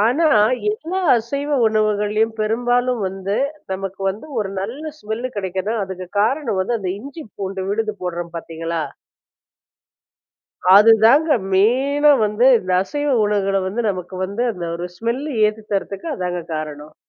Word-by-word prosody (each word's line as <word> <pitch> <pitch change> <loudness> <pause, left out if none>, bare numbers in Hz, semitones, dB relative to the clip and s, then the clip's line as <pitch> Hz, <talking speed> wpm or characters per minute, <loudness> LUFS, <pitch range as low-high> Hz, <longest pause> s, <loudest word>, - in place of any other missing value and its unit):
ஆனா, 300 +8 +3 0.4
எல்லா 330 - -3 0.2
அசைவ 280 +6 -3 0.2
உணவுகள்ளையும், 215 0 +1
பெரும்பாலும் 245 +1 +1
வந்து, 195 +2 -3 0.4
நமக்கு 195 0 -5
வந்து, 215 +10 -8
ஒரு 205 -3 -1
நல்ல 285 +10 -5
ஸ்மெல்லு 220 +4 -4
கிடைக்குதுன்னா, 190 +3 -2
அதுக்கு 185 -1 -7
காரணம் 235 -2 0
வந்து, 230 +4 -1
அந்த 185 - -3
இஞ்சி 280 +7 -9
பூண்டு 195 -1 -4
விழுது 215 +1 -1
போடுறோம் 175 -1 -4
பார்த்தீங்களா 165 0 -4 1.9
அதுதாங்க 225 +9 +6 0.2
மெயினா 270 +9 +4
வந்து 210 +4 +1
இந்த 185 0 -4
அசைவ 290 +8 -3 0.2
உணவுகள 195 -1 +1
வந்து 225 +5 -2
நமக்கு 185 -1 -5
வந்து 200 +6 -3
அந்த 180 -5 -6
ஒரு 175 +1 -4
ஸ்மெல்லு 255 +8 -3
ஏத்தி 215 +1 -2
தரத்துக்கு 195 - -3
அதாங்க 180 -2 -3
காரணம். 150 -1 -6
210 Hz, 130 wpm, -20 LUFS, 190-245 Hz, 1.9 s, அதுதாங்க